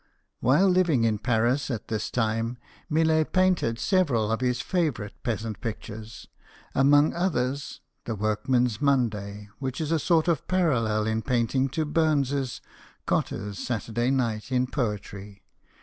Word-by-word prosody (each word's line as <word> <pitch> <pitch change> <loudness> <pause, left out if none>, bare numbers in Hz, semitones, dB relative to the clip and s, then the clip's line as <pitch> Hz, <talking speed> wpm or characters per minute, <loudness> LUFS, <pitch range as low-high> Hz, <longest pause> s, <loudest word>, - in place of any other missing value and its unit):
While 145 +10 +4
living 180 -9 +3
in 110 -2 +1
Paris 120 +5 +1
at 115 -5 -4
this 110 -2 -2
time, 115 +1 -1 0.3
Millet 160 0 +2
painted 185 -11 +2
several 125 - +1
of 115 - -1
his 125 -1 +1
favourite 145 - -1
peasant 110 -3 -3
pictures, 110 -1 -7 0.5
amongst 145 +2 +4
others 140 -6 -1
" - - -49
The 115 - -3
Workman's 110 +3 0
Monday," 105 -7 0
which 130 -1 -4
is 160 -1 -2
a 165 - +2
sort 165 +1 +2
of 165 -5 0
parallel 115 -13 +1
in 110 0 0
painting 125 +3 +1
to 160 - +1
Burns's 145 -4 0 0.2
" - - -27
Cotter's 100 +1 -2
Saturday 120 0 -1
Night" 120 -3 -1
in 125 0 +2
poetry. 105 -5 -4
125 Hz, 140 wpm, -26 LUFS, 110-145 Hz, 0.5 s, While